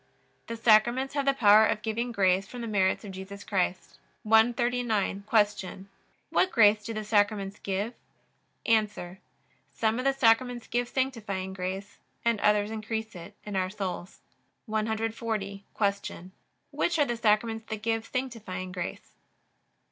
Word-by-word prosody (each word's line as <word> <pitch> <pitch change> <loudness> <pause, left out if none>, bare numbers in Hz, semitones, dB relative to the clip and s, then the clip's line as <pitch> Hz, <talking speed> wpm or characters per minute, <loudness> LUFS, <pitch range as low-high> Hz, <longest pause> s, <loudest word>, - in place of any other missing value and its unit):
The 230 - -5
Sacraments 240 +4 +4
have 280 -1 -1
the 275 - +4
power 215 -3 +7
of 215 -1 0
giving 235 +2 -2
grace 195 -3 +2
from 245 +3 -8
the 230 - -4
merits 195 -2 +1
of 200 - -7
Jesus 190 +2 -8
Christ. 185 -2 -2 0.2
139. 225 -2 +2
Q. 205 -3 +1 0.5
What 370 - +3
grace 210 -2 +5
do 230 - -5
the 215 -1 -4
Sacraments 205 -1 +1
give? 200 +4 -2 0.7
A. 210 -5 0 0.6
Some 225 +1 +1
of 255 - -3
the 275 - +4
Sacraments 240 -1 +2
give 240 +1 -1
sanctifying 215 -9 -2
grace, 190 +2 -5 0.3
and 230 -2 +2
others 210 0 +3
increase 220 0 -4
it 175 +2 -10
in 205 -1 -5
our 185 -1 0
souls. 190 -3 -5 0.4
140. 220 -2 -2
Q. 200 -3 -2 0.4
Which 345 - 0
are 295 - +4
the 240 - -2
Sacraments 225 0 +1
that 215 -1 -5
give 225 0 0
sanctifying 215 -8 -4
grace? 180 -2 -6
215 Hz, 140 wpm, -28 LUFS, 195-230 Hz, 0.7 s, power